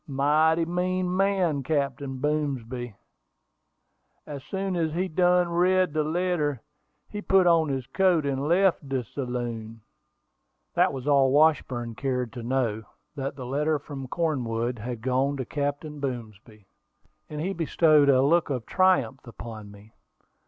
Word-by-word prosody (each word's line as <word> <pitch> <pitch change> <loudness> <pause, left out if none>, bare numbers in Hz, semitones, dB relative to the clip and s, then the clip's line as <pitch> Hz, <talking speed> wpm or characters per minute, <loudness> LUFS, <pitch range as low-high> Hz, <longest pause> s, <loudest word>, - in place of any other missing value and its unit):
Mighty 155 +4 +2
mean 180 +1 -1
man, 185 -6 +1
Captain 140 -2 -2
Boomsby. 130 -5 -2 1.3
As 140 -3 -8
soon 190 +1 -3
as 160 -3 -1
he 180 +3 -1
done 180 +1 +3
read 180 0 +2
de 155 -1 +1
letter, 155 -4 -1 0.5
he 210 - -6
put 190 -2 +3
on 165 -3 +4
his 135 -2 -2
coat, 180 -1 +2
and 140 0 -1
left 175 -4 +2
de 130 -2 -1
saloon." 120 -3 -5 0.9
That - - +3
was 130 -1 -6
all 140 -2 +4
that 135 - +1
Washburn 130 -6 +2
cared 125 -1 -2
to 120 - -7
know 115 -3 -1 0.3
that 135 -1 -4
the 130 -2 -7
letter 150 +4 0
from 140 -2 -8
Cornwood 125 -7 -2
had 120 +1 -5
gone 130 +3 0
to 130 - -3
Captain 145 +2 -3
Boomsby; 110 -5 -7 0.6
and 150 - -6
he 185 +5 -2
bestowed 155 -3 +3
a 130 -1 +5
look 165 +4 +3
of 125 -5 -3
triumph 180 -10 +2
upon 115 -3 -9
me. 105 +2 -16
140 Hz, 145 wpm, -26 LUFS, 125-165 Hz, 1.3 s, a